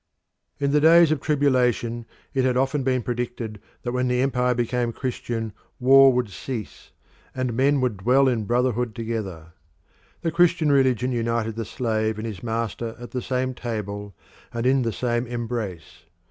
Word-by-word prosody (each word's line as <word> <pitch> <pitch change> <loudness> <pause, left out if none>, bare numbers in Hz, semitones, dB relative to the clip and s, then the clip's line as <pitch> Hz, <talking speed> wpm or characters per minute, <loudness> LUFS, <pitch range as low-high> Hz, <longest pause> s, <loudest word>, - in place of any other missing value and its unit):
In 140 0 0
the 150 0 +3
days 165 0 +7
of 155 -3 0
tribulation 125 -5 +1 0.3
it 135 -2 +1
had 125 -1 +2
often 135 +2 +1
been 130 -2 0
predicted 120 -3 -4 0.2
that 120 - -2
when 125 0 0
the 125 0 +1
empire 125 -2 +1
became 120 0 0
Christian 115 -3 -4 0.3
war 135 +1 +7
would 125 -4 -1
cease, 105 - -7 0.5
and 130 -2 -1
men 135 +3 +2
would 125 -5 0
dwell 125 +8 +3
in 115 -4 0
brotherhood 120 0 0
together. 100 -8 -5 0.7
The 165 - -1
Christian 170 -2 +3
religion 130 -3 +2
united 115 -2 -1
the 115 -1 -3
slave 110 -2 -1
and 110 - -5
his 105 -5 -6
master 115 0 -3
at 120 0 -10
the 125 - -3
same 130 +1 -1
table 105 -5 -5 0.4
and 115 0 -3
in 130 +1 +4
the 115 -2 0
same 120 +2 -1
embrace. 115 -8 -5
120 Hz, 160 wpm, -24 LUFS, 115-130 Hz, 0.7 s, days